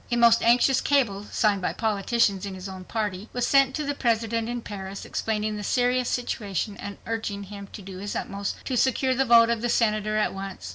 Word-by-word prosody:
A 240 Hz, -, +1 dB
most 235 Hz, -1 st, +5 dB
anxious 245 Hz, +3 st, +4 dB
cable, 220 Hz, -8 st, +1 dB
signed 205 Hz, -3 st, +2 dB
by -, -, -1 dB
politicians 210 Hz, -2 st, +1 dB
in 195 Hz, -1 st, -5 dB
his 185 Hz, +1 st, -7 dB
own 190 Hz, -1 st, -8 dB
party, 210 Hz, -2 st, -3 dB
was 245 Hz, -1 st, 0 dB
sent 275 Hz, -1 st, +4 dB
to 305 Hz, -, -2 dB
the 285 Hz, 0 st, -1 dB
President 230 Hz, -3 st, 0 dB
in 240 Hz, -1 st, -4 dB
Paris 195 Hz, -1 st, -7 dB
explaining 215 Hz, -1 st, -2 dB
the 205 Hz, -, -5 dB
serious 250 Hz, +2 st, +1 dB
situation 205 Hz, -4 st, -2 dB
and 200 Hz, -1 st, -7 dB
urging 220 Hz, -3 st, -3 dB
him 200 Hz, 0 st, -9 dB
to 205 Hz, -, -9 dB
do 190 Hz, -1 st, -8 dB
his 205 Hz, +1 st, -5 dB
utmost 200 Hz, 0 st, -3 dB
to 260 Hz, -, -2 dB
secure 260 Hz, +1 st, +2 dB
the 270 Hz, +1 st, +1 dB
vote 235 Hz, -1 st, +6 dB
of 230 Hz, -2 st, -1 dB
the 240 Hz, -, -1 dB
Senator 215 Hz, -2 st, +1 dB
at 215 Hz, -, +1 dB
once. 195 Hz, -, -7 dB
220 Hz, 210 wpm, -25 LUFS, 200-240 Hz, -, vote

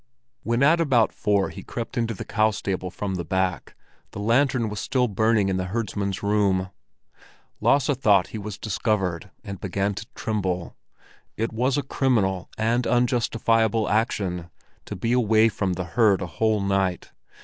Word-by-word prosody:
When 115 Hz, +3 st, 0 dB
at 165 Hz, +4 st, +5 dB
about 125 Hz, -8 st, +3 dB
four 100 Hz, -2 st, +1 dB
he 100 Hz, -, -9 dB
crept 115 Hz, +4 st, -6 dB
into 115 Hz, -2 st, -1 dB
the -, -, -7 dB
cow 110 Hz, 0 st, +2 dB
stable 95 Hz, -3 st, -3 dB
from 95 Hz, +2 st, -4 dB
the 90 Hz, -2 st, -3 dB
back, 95 Hz, +1 st, -2 dB, 0.4 s
the -, -, -6 dB
lantern 120 Hz, +2 st, +2 dB
was 105 Hz, -1 st, -5 dB
still 125 Hz, +3 st, +1 dB
burning 110 Hz, -1 st, +2 dB
in 95 Hz, -1 st, 0 dB
the 95 Hz, -, -2 dB
herdsman's 100 Hz, -1 st, -3 dB
room. 100 Hz, -2 st, +1 dB, 0.9 s
Lasse 140 Hz, -1 st, +3 dB
thought 105 Hz, -7 st, +3 dB
he 110 Hz, -, -6 dB
was 105 Hz, 0 st, -6 dB
discovered, 100 Hz, -3 st, -1 dB
and 100 Hz, -4 st, -7 dB
began 100 Hz, +1 st, -1 dB
to 100 Hz, +2 st, -7 dB
tremble; 95 Hz, -5 st, -2 dB, 0.6 s
it 115 Hz, +1 st, -2 dB
was 125 Hz, +4 st, +1 dB
a 145 Hz, -, 0 dB
criminal 105 Hz, -9 st, 0 dB
and 115 Hz, +3 st, +1 dB
unjustifiable 115 Hz, -2 st, +2 dB
action 100 Hz, -6 st, -1 dB, 0.4 s
to -, -, -6 dB
be 115 Hz, +6 st, -2 dB
away 115 Hz, -2 st, +4 dB
from 95 Hz, -3 st, -1 dB
the 90 Hz, 0 st, -4 dB
herd 100 Hz, 0 st, +2 dB
a -, -, -2 dB
whole 105 Hz, +6 st, 0 dB
night. 95 Hz, -2 st, -1 dB
105 Hz, 160 wpm, -24 LUFS, 95-115 Hz, 0.9 s, at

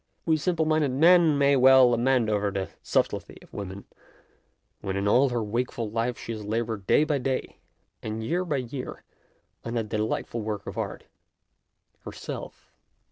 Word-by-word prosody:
We 160 Hz, -, +3 dB
simple 160 Hz, +1 st, 0 dB
minded 155 Hz, -2 st, +2 dB
men 165 Hz, +1 st, +5 dB
may 140 Hz, 0 st, +4 dB
well 130 Hz, -1 st, +7 dB
lament 120 Hz, 0 st, +2 dB
over 105 Hz, -1 st, +1 dB
the 95 Hz, -1 st, -3 dB
sub -, -, +1 dB
tlety -, -, -9 dB
of -, -, -20 dB
woman, 100 Hz, 0 st, -7 dB, 0.9 s
when 95 Hz, -1 st, -4 dB
in 100 Hz, +1 st, -1 dB
all 130 Hz, +6 st, +4 dB
her 120 Hz, -2 st, -1 dB
wakeful 115 Hz, 0 st, -3 dB
life 115 Hz, +2 st, -1 dB
she -, -, -7 dB
has 110 Hz, -2 st, -5 dB
laboured 110 Hz, -1 st, -3 dB
day -, -, +5 dB
by 150 Hz, -2 st, 0 dB
day 130 Hz, 0 st, -3 dB, 0.4 s
and 110 Hz, +1 st, -4 dB
year 175 Hz, +10 st, 0 dB
by 155 Hz, -6 st, -1 dB
year 125 Hz, +1 st, -6 dB, 0.6 s
on 115 Hz, +1 st, -5 dB
that 110 Hz, -2 st, -2 dB
delightful 110 Hz, +2 st, -2 dB
work 105 Hz, -2 st, -4 dB
of -, -, -7 dB
art, -, -, -4 dB, 1.0 s
her -, -, -9 dB
self. -, -, -8 dB
120 Hz, 170 wpm, -26 LUFS, 110-140 Hz, 1.0 s, well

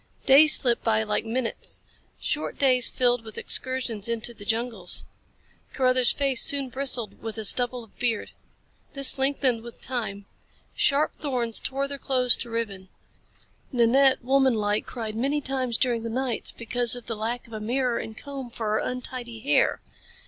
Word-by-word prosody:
Days 295 Hz, +3 st, +8 dB
slipped 240 Hz, -3 st, +1 dB
by 220 Hz, -1 st, +1 dB
like 210 Hz, +1 st, -2 dB
minutes. 235 Hz, +1 st, -3 dB, 0.4 s
Short 305 Hz, -, -3 dB
days 255 Hz, -3 st, +3 dB
filled 245 Hz, -2 st, +1 dB
with 220 Hz, -1 st, -11 dB
excursions 250 Hz, -5 st, -1 dB
into 230 Hz, +1 st, -2 dB
the 205 Hz, -, -11 dB
jungles. 225 Hz, -4 st, 0 dB, 0.7 s
Carruthers' 255 Hz, -2 st, +3 dB
face 275 Hz, -3 st, +1 dB
soon 280 Hz, -2 st, +1 dB
bristled 255 Hz, -3 st, 0 dB
with 225 Hz, 0 st, -6 dB
a 220 Hz, -, -2 dB
stubble 245 Hz, +2 st, +3 dB
of 220 Hz, -, -21 dB
beard. 235 Hz, -3 st, -2 dB, 0.6 s
This 275 Hz, -1 st, +5 dB
lengthened 265 Hz, -3 st, +1 dB
with 235 Hz, 0 st, -12 dB
time. 220 Hz, -6 st, -4 dB, 0.5 s
Sharp 290 Hz, +2 st, +2 dB
thorns 245 Hz, -6 st, -1 dB
tore 275 Hz, +1 st, -3 dB
their 280 Hz, 0 st, -6 dB
clothes 255 Hz, -2 st, +3 dB
to 240 Hz, -, -6 dB
ribbons. 210 Hz, -5 st, -5 dB, 0.8 s
Nanette, 260 Hz, +1 st, +3 dB
womanlike, 235 Hz, -6 st, +1 dB
cried 225 Hz, -3 st, -6 dB
many 275 Hz, +6 st, 0 dB
times 260 Hz, -4 st, -1 dB
during 240 Hz, -3 st, 0 dB
the 230 Hz, -, -5 dB
nights 250 Hz, 0 st, -1 dB
because 240 Hz, 0 st, +1 dB
of 245 Hz, -2 st, -9 dB
the 230 Hz, -, -4 dB
lack 230 Hz, +3 st, -4 dB
of 230 Hz, -, -15 dB
a 215 Hz, -, -5 dB
mirror 245 Hz, +2 st, -1 dB
and 220 Hz, 0 st, -8 dB
a -, -, -7 dB
comb 275 Hz, -3 st, -8 dB
for 225 Hz, -2 st, -4 dB
her 215 Hz, -, +1 dB
untidy 250 Hz, -2 st, -5 dB
hair. 275 Hz, -, +1 dB
245 Hz, 165 wpm, -25 LUFS, 225-265 Hz, 0.8 s, Days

